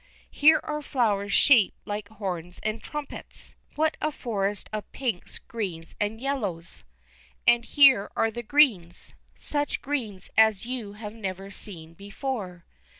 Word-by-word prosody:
Here 315 +2 +6
are 300 0 -3
flowers 210 -8 0
shaped 225 -3 +5
like 205 -1 -4
horns 180 -5 -4
and 215 +1 -2
trumpets. 295 -1 -7 0.2
What 315 +1 +1
a 305 - 0
forest 205 -6 -2
of 215 -1 -5
pinks, 235 -9 -3
greens, 180 -8 -6
and 210 +2 -1
yellows! 210 -11 -3 0.6
And 235 0 +5
here 270 -6 +6
are 225 - +2
the 240 +2 -5
greens. 225 - +2 0.2
Such 290 -1 -1
greens 230 -10 -3
as 220 -2 +4
you 240 -5 -5
have 210 0 -8
never 195 -3 -6
seen 165 -5 -4
before. 200 -2 -5
215 Hz, 135 wpm, -26 LUFS, 195-260 Hz, 0.6 s, Here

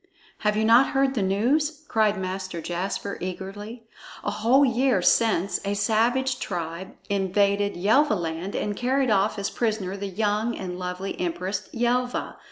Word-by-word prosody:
"Have 210 0 +1
you 220 - +2
not 235 +6 +5
heard 270 0 +2
the 230 - -1
news?" 280 +11 +1
cried 215 -2 +2
Master 185 -1 -4
Jasper 185 +4 -3
eagerly. 195 +5 -6 0.4
"A - - -1
whole 250 +6 +4
year 250 -3 +2
since, 200 -2 +2
a 200 +1 -1
savage 235 +5 +1
tribe 170 +2 -5
invaded 200 +1 +1
Yelvaland 195 - +1
and 205 -1 -2
carried 260 +1 +1
off 205 +1 +2
as 200 0 -2
prisoner 215 -5 -1
the 200 0 -4
young 210 +4 0
and 180 -1 -5
lovely 180 +1 -4
Empress 185 +3 -3
Yelva. 245 +1 -1
205 Hz, 145 wpm, -25 LUFS, 190-235 Hz, 0.4 s, not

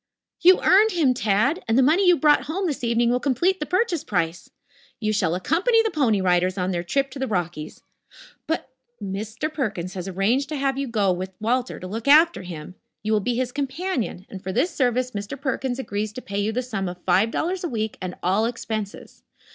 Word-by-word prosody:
"You 365 +2 +7
earned 420 +4 +5
him, 300 -7 +3
Tad, 245 - +1
and 225 +1 +2
the 265 - +6
money 340 +8 +4
you 355 -1 +6
brought 300 -1 +4
home 370 +6 -2
this 295 -7 -3
evening 235 0 +2
will 250 - +2
complete 320 +9 +1
the 300 - -3
purchase 365 -4 0
price. 175 -3 -2 0.5
You 215 -2 0
shall 180 -5 +1
accompany 385 - +2
the 445 - -1
Pony 230 -10 +2
Riders 180 +1 +2
on 185 0 -1
their 175 -1 -1
trip 270 +10 -1
to 270 - -8
the 265 - -1
Rockies 175 -6 -4 0.3
" - - -17 0.2
"But 320 -4 -2 0.2
" 240 - -47
"Mr. 215 +9 -4
Perkins 200 - -3
has 185 -1 -5
arranged 215 +9 0
to 310 - -3
have 270 -1 0
you 275 0 -2
go 210 -5 +1
with 185 +1 -4
Walter 245 +3 -1
to - - -8
look 220 +7 -5
after 315 - +6
him. 175 -2 -8 0.3
You 215 +1 0
will 215 - +3
be 240 +4 -1
his 250 0 -1
companion, 275 - -3
and 190 - -9
for 190 - -4
this 340 - +1
service 250 -2 +1
Mr. 205 +6 -6
Perkins 265 -2 -2
agrees 210 -5 -3
to 255 - -7
pay 200 0 -4
you 205 +2 0
the 250 +3 -2
sum 205 -7 -3
of 180 0 -10
five 190 +5 +3
dollars 360 +9 -2
a 345 - -2
week 220 -3 -3
and 185 -1 -4
all 195 +5 +2
expenses. 220 -3 -5
235 Hz, 220 wpm, -23 LUFS, 195-285 Hz, 0.5 s, You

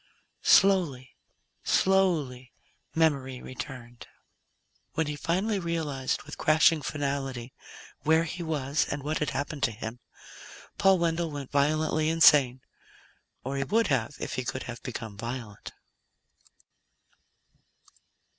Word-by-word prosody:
Slowly, 165 -11 +3 0.5
slowly, 160 -10 +1 0.4
memory 140 -5 +1
returned. 125 -2 -9 0.9
When 160 - 0
he 150 0 -3
suddenly 190 +8 0
realized, 160 -7 -2
with - - -10
crashing 155 0 +4
finality, 135 -4 -3 0.5
where 160 +2 +3
he 170 +2 -5
was 150 -3 -1
and 140 -1 -4
what 155 +2 -1
had 150 - 0
happened 145 +1 -4
to 120 - +2
him, 110 +2 -7 0.8
Paul 195 0 +5
Wendell 170 -1 0
went 145 -3 -7
violently 155 +2 +1
insane. 145 -6 +5 0.8
Or 135 +2 -3
he 135 - 0
would 225 +10 +1
have, 135 0 0
if - - -4
he 130 - -2
could 130 +1 -4
have 120 -1 -8
become 110 -5 -7
violent. 115 -3 -6
145 Hz, 115 wpm, -28 LUFS, 130-160 Hz, 0.9 s, Paul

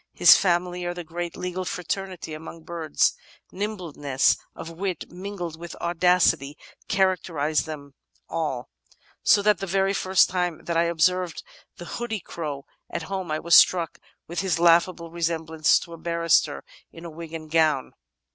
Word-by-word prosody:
"His - - +9
family 180 -1 0
are 175 0 -3
the 175 - -6
great 170 +1 -5
legal 180 +1 -3
fraternity 180 -1 -4
among 160 +1 -9
birds; 160 -2 0 0.4
nimbleness 170 -10 0 0.2
of 165 - -8
wit 185 +2 -4
mingled 175 -3 -6
with 170 0 -8
audacity 170 -4 +2 0.3
characterise 170 -6 +1
them 145 -3 -8 0.3
all, 140 -7 -3 0.5
so 205 - +4
that 210 -3 +3
the 195 - -4
very 195 +2 +1
first 190 -1 +3
time 180 -3 -2
that 170 - -2
I 165 +1 +3
observed 170 +1 +1 0.3
the 175 - -8
hoodie 225 +3 -4
crow 150 -5 -6 0.2
at 170 - -4
home 190 -3 -3
I 155 - 0
was 170 +1 +3
struck 170 -3 +5 0.3
with 170 - -4
his 190 -5 0
laughable 170 0 +3
resemblance 160 -2 +1
to 170 - -10
a - - -8
barrister 170 -2 +1 0.3
in 165 -1 -10
wig 165 -1 -9
and 155 -1 -8
gown. 155 -5 +2
170 Hz, 150 wpm, -25 LUFS, 160-180 Hz, 0.5 s, His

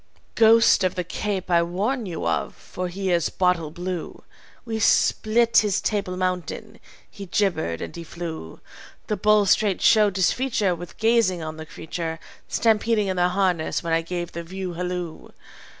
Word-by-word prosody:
"Ghost 230 -2 +5
of 185 -1 0
the 180 - -2
Cape 190 +1 -3
I 170 -1 +5
warn 205 +8 -2
you 165 - -5
of, 85 - -1
for 180 0 -6
he 190 +1 -3
is 170 -2 +2
bottle 180 -4 +1
blue. 175 +1 -6 0.4
We 225 -2 -3
split 230 +1 +3
his 205 -3 +3
Table 200 -4 -2
Mountain. 185 +4 -3 0.3
He 200 -1 -10
gibbered 170 - 0
and 85 - -8
he 170 - -7
flew. 165 - -7 0.4
The 210 - -1
bulls 210 0 +4
straight 205 -4 +2
showed 210 -3 +4
disfeature 205 0 +1
With 175 0 -9
gazing 220 -6 +2
on 155 0 -6
the 160 0 -8
creature, 165 +1 -5 0.3
Stampeding 220 -2 +1
in 185 - -1
their 180 0 +3
harness 180 -3 0
when 165 -1 -1
I 165 - +3
gave 175 +1 -5
the 170 - -5
view 185 +1 -6
halloo. 180 -1 -5
185 Hz, 165 wpm, -24 LUFS, 170-210 Hz, 0.4 s, Ghost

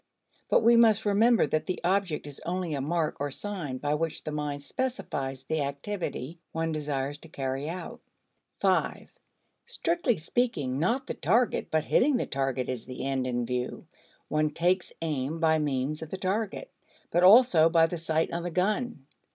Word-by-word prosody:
But - - +4
we 235 +1 +6
must 220 -2 +5
remember 220 +3 +4
that 155 - -1
the 185 - -2
object 180 -4 0
is 145 -2 -8
only 175 -2 -2
a 140 - -2
mark 155 +2 -1
or 145 +1 -1
sign 165 -4 -4
by 145 +3 -1
which 160 +1 -2
the 155 - -4
mind 145 -1 -3
specifies 140 - -3
the 160 +2 -1
activity 145 +1 -4
one 165 0 -1
desires 145 -2 -3
to 165 - -13
carry 135 0 -3
out. 175 +1 -7 1.7
Strictly 340 - 0
speaking, 155 - -1
not 240 - +1
the - - -4
target 225 - +1
but 155 -1 +1
hitting 270 - +3
the - - -1
target 135 -2 -1
is 125 -3 -4
the 130 +1 -6
end 135 -2 -1
in 120 -1 -1
view; 125 +1 -3 0.4
one 155 +1 +1
takes 175 +4 0
aim 150 0 -2
by 160 -1 +3
means 145 +1 -1
of 160 - -6
the 190 - -4
target, 205 - -2 0.4
but 175 - +3
also 185 -5 +7
by 165 -1 +5
the 165 +1 -4
sight 160 0 0
on 170 - -1
the 175 - -3
gun. 185 - -1
160 Hz, 170 wpm, -28 LUFS, 140-190 Hz, 1.7 s, also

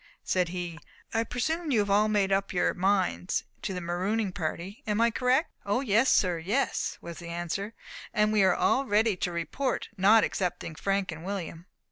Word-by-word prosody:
Said 180 -2 +1
he, 175 -2 -5 0.3
"I 225 0 +2
presume 315 +8 -2
you 255 - +2
have 200 -1 -1
all 210 +2 +4
made 205 -2 +1
up 195 0 +1
your 180 - +2
minds 190 -1 +1 0.2
to - - -3
the 180 -1 -4
marooning 190 +5 -1
party; 180 - -4
am 210 0 0
I 235 0 +4
correct?" 255 +7 +1
"O 205 +5 0
yes, 235 0 +3
sir, 180 -3 +3
yes," 210 +12 -1
was 170 -1 -8
the 170 - -9
answer, 175 +6 -4 0.4
"and 210 -1 +2
we 210 - +4
are 190 -2 +4
all 270 - +2
ready 215 0 +3
to 180 - -1
report, 230 +10 -2
not 210 +4 +6
excepting 180 -3 -2
Frank 195 +2 -1
and 160 0 -8
William." 180 -3 -5
195 Hz, 185 wpm, -28 LUFS, 175-220 Hz, 0.4 s, not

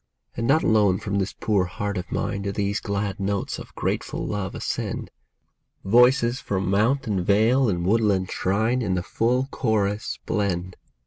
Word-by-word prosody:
And 115 - -2
not 155 +4 +4
alone 105 -4 +3
from 100 +1 -2
this 95 +1 -2
poor 105 -5 +1
heart 100 +3 -4
of 90 -2 -5
mine 100 -1 -2
Do 100 0 -2
these 100 +1 -1
glad 100 -1 -3
notes 100 0 -2
of - - -11
grateful - - -2
love 100 -2 -3
ascend; - - -3 0.7
Voices 125 +3 +4
from 95 -1 -2
mount 115 +8 +2
and 100 -5 -1
vale 115 +6 +3
and 85 -3 -1
woodland 100 -3 +2
shrine 110 +7 0
In 95 -5 0
the 90 - -1
full 120 +7 0
chorus 105 -2 -1
blend. 95 -3 -1
100 Hz, 165 wpm, -24 LUFS, 95-115 Hz, 0.7 s, not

